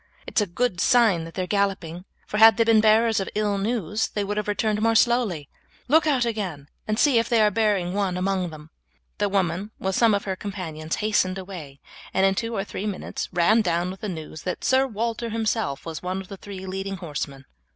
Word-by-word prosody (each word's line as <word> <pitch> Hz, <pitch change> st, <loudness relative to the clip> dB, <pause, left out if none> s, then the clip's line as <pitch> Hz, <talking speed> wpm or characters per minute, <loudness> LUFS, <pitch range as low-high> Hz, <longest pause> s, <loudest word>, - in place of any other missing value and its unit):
It's -, -, 0 dB
a 205 Hz, -, 0 dB
good 185 Hz, +1 st, -1 dB
sign 220 Hz, -9 st, +4 dB
that 165 Hz, -, -11 dB
they 185 Hz, -, -1 dB
are -, -, -2 dB
galloping, 185 Hz, -3 st, -1 dB, 0.2 s
for 210 Hz, -, -3 dB
had 220 Hz, -1 st, +8 dB
they 230 Hz, -, +5 dB
been 225 Hz, -1 st, +5 dB
bearers 220 Hz, 0 st, +4 dB
of 195 Hz, -, -3 dB
ill 205 Hz, -1 st, 0 dB
news 210 Hz, -1 st, -1 dB
they 205 Hz, -, -3 dB
would 205 Hz, +1 st, -3 dB
have 210 Hz, 0 st, -2 dB
returned 210 Hz, 0 st, 0 dB
more 225 Hz, 0 st, +3 dB
slowly; 225 Hz, -, +2 dB, 0.4 s
look 315 Hz, +4 st, +4 dB
out 265 Hz, -5 st, +2 dB
again 185 Hz, -11 st, -4 dB, 0.2 s
and 215 Hz, 0 st, 0 dB
see 260 Hz, -2 st, +4 dB
if 230 Hz, -, -1 dB
they 235 Hz, -, +3 dB
are 210 Hz, -1 st, +4 dB
bearing 200 Hz, -4 st, +1 dB
one 195 Hz, -3 st, -1 dB
among 185 Hz, -1 st, 0 dB
them." 155 Hz, 0 st, -12 dB, 0.5 s
The 205 Hz, -1 st, +1 dB
woman, 190 Hz, 0 st, 0 dB
with 190 Hz, 0 st, -2 dB
some 225 Hz, +1 st, +4 dB
of 200 Hz, -, -2 dB
her 190 Hz, -1 st, -3 dB
companions, 165 Hz, -6 st, -5 dB
hastened 195 Hz, -3 st, +1 dB
away, 175 Hz, -8 st, -9 dB, 0.3 s
and 190 Hz, +1 st, +4 dB
in 195 Hz, -, +4 dB
two 230 Hz, +3 st, -3 dB
or 195 Hz, -, -1 dB
three 205 Hz, +1 st, -5 dB
minutes 200 Hz, -3 st, -4 dB
ran 185 Hz, +6 st, +4 dB
down 175 Hz, -2 st, 0 dB
with 190 Hz, -, -10 dB
the 210 Hz, -, -3 dB
news 160 Hz, -3 st, -7 dB
that 180 Hz, -, -4 dB
Sir 265 Hz, +1 st, +3 dB
Walter 230 Hz, 0 st, -3 dB
himself 220 Hz, -, -1 dB
was 160 Hz, -2 st, -5 dB
one 185 Hz, +1 st, -3 dB
of 190 Hz, -, -9 dB
the 195 Hz, -, -8 dB
three 190 Hz, -1 st, -8 dB
leading 195 Hz, +1 st, -4 dB
horsemen. 140 Hz, -5 st, -6 dB
200 Hz, 220 wpm, -24 LUFS, 180-220 Hz, 0.5 s, had